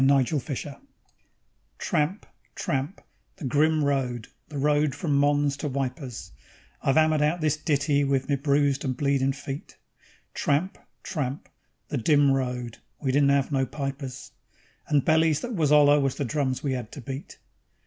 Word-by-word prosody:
The 140 +1 +5
Red 130 -3 +2
Retreat 145 -1 -3 1.0
_Tramp, 170 +4 -1 0.3
tramp, 140 +7 -2 0.3
the 155 - -7
grim 155 +3 +2
road, 130 -5 -1 0.2
the 150 - -6
road 145 0 +2
from 145 0 -1
Mons 145 0 +2
to 150 - -3
Wipers 130 -2 -4 0.5
(I've 135 - +1
'ammered 155 -1 +4
out 150 +4 +2
this 155 -2 +1
ditty 145 -2 +1
with 135 -1 0
me 140 - +2
bruised 140 0 +1
and 130 -3 -2
bleedin' 140 -1 +2
feet); 140 +1 -7 0.6
Tramp, 165 +8 0 0.2
tramp, 140 -4 -4 0.4
the 140 - -1
dim 145 +3 +4
road 125 -3 -2 0.2
we 135 -3 0
didn't 140 +1 +4
'ave 140 -1 +2
no 135 -2 +1
pipers, 135 -1 -5 0.6
And 145 -3 +2
bellies 160 -1 +3
that 245 0 -4
was 155 -7 +1
'oller 145 0 +6
was 135 -2 0
the 140 - -2
drums 130 -1 -1
we 140 -2 0
'ad 120 -3 -6
to 140 - -7
beat. 135 +4 -7
140 Hz, 160 wpm, -26 LUFS, 135-150 Hz, 1.0 s, oller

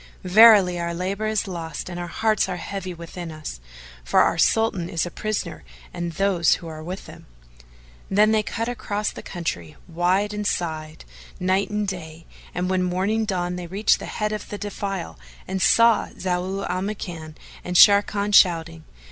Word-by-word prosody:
Verily 190 -2 +7
our 170 0 -3
labour 195 +4 -2
is 215 -2 -1
lost 165 -4 -5
and 175 -1 -6
our 175 - -4
hearts 215 +4 0
are 180 - -3
heavy 190 0 -5
within 170 0 -8
us, 155 - -7 0.4
for - - +3
our - - +3
Sultan 210 -6 +1
is 165 - -1
a 175 - -6
prisoner 215 - -4 0.3
and 170 -1 -4
those 185 -2 +2
who 170 - -10
are 155 -1 -8
with 180 +4 -7
him." - - -13 0.8
Then 210 +2 +4
they 220 -1 +3
cut 230 +2 -4
across 210 -4 -2
the - - -9
country, 85 - -5
wide 185 +5 0
and 210 0 -2
side, 155 -4 -3 0.3
night 185 +3 +1
and 210 0 -2
day, 165 -3 -7 0.3
and 180 +1 -1
when 185 0 +1
morning 190 +5 0
dawned 180 -3 -2
they 175 - -6
reached 200 +5 +2
the - - -7
head 210 -1 -2
of 215 - -5
the 205 - -5
defile 195 - -5 0.3
and 190 0 -3
saw 230 +3 +5
Zau 185 +2 -2
al 180 +1 -2
Makan 175 -6 -6 0.3
and 180 - -5
Sharrkan 205 +1 +5
shouting. 165 -4 +4
185 Hz, 175 wpm, -23 LUFS, 170-205 Hz, 0.8 s, Verily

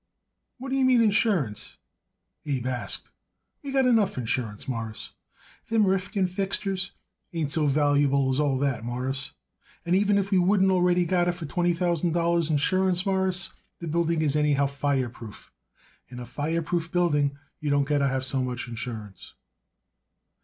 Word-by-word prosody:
"What 265 +1 -7
do 270 - 0
you 270 - +2
mean, 255 -3 +5
insurance?" 200 - +1 0.7
Abe 135 -4 -1
asked. 125 -1 -4 0.5
"We 280 - -6
got 270 -1 +3
enough 225 - +3
insurance, 115 -2 -3
Mawruss. 115 -4 -5 0.6
Them 225 -2 +3
Rifkin 195 +1 +1
fixtures 190 0 -2 0.4
ain't 155 -4 -2
so 155 -1 +3
valuable 140 -1 +2
as 130 - 0
all 145 -3 +2
that, 130 -4 -1
Mawruss, 130 +3 -3 0.5
and 175 +2 +2
even 205 +1 +3
if 200 0 -1
we 190 - +4
wouldn't 190 +1 +3
already 180 -1 +3
got 175 0 +1
it 175 - +2
for 170 -2 -7
twenty 175 +3 +1
thousand 170 -1 0
dollars 170 -1 +1
insurance, 185 +4 +1
Mawruss, 190 -1 0 0.2
the 170 - -7
building 165 0 +1
is 145 -2 +1
anyhow 145 -2 +2
fireproof. 135 -5 -3 0.6
In 125 -1 -8
a 125 - -6
fireproof 165 +4 -2
building 145 -5 +1 0.2
you 150 - -3
don't 145 0 +3
got 145 +1 +1
to 140 - +2
have 130 -1 -1
so 130 0 -1
much 125 0 -3
insurance." 110 -4 -7
160 Hz, 155 wpm, -26 LUFS, 135-185 Hz, 0.7 s, mean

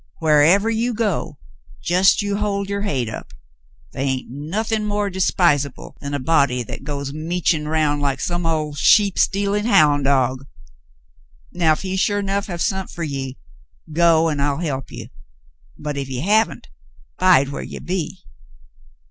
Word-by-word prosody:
Wharevah 165 +9 +4
you 235 +1 -1
go, 200 -9 -2 0.5
just 185 +4 +3
you 200 0 -1
hold 200 -1 -1
your 200 0 -3
hade 135 - -1
up. 105 -10 -8 0.6
The' - - -9
hain't 130 -3 -2
nothin' 210 - -2
more 205 -1 -1
despisable 170 -7 0
than 140 0 -4
a - - -1
body 135 -3 +2
'at - - -7
goes 140 -1 -4
meachin' 160 0 -1
around 150 -2 +1
like 140 -2 -1
some 175 +2 -2
old 155 -3 -2
sheep 205 +2 +4
stealin' 200 +1 +1
houn' 150 -9 +4
dog. 135 -1 +1 1.0
Now 165 -3 +3
if 155 - -5
he 190 0 -3
sure 205 +1 +1
'nough 195 0 -1
have 175 -3 -3
sont 190 -1 -2
fer 170 - -6
ye, 135 -3 -4 0.6
go, 165 0 +4
an' 150 - -3
I'll 140 0 0
help 140 -6 -3
ye, - - -9 0.7
but 150 -1 -5
if 140 -1 -3
he 130 -1 -4
haven't, 215 +6 +1 0.5
bide 175 -7 +5
whar 140 - -5
ye - - -7
be." 180 0 -4
160 Hz, 155 wpm, -21 LUFS, 140-195 Hz, 1.0 s, bide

